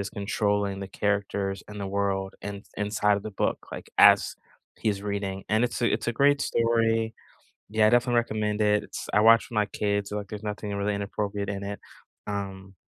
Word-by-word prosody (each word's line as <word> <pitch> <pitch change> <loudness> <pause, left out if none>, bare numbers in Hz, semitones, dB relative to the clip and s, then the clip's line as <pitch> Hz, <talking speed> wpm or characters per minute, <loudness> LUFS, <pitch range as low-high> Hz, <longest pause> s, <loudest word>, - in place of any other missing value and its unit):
is 100 0 -4
controlling 100 -1 -1
the 100 - -4
characters 100 -1 -1
and 105 -1 -8
the 100 - -3
world 95 -1 -1
in 100 0 -6
inside 105 0 +1
of 100 - -5
the 110 - -4
book, - - 0
like, - - -8
as - - +6 0.4
he's 100 -2 -1
reading, 100 -2 -3
and 110 +3 +3
it's 120 0 -2
a 120 - +3
it's - - -1
a 120 - +1
great 140 +4 +3
story, 115 -1 +1 0.6
yeah, 110 0 +4
I - - +5
definitely 120 0 +3
recommend 110 -2 -1
it, 105 0 +3
it's - - -7
I 105 - +5
watch 115 +1 +6
with 115 - -8
my 105 - +3
kids, 100 -1 -1
like, 105 -1 -4
there's 105 0 -7
nothing 105 -1 -4
really 100 +1 0
inappropriate 100 0 -3
in 100 0 -4
it, 100 +1 -5 0.5
um 95 -1 -5
105 Hz, 195 wpm, -27 LUFS, 100-110 Hz, 0.6 s, as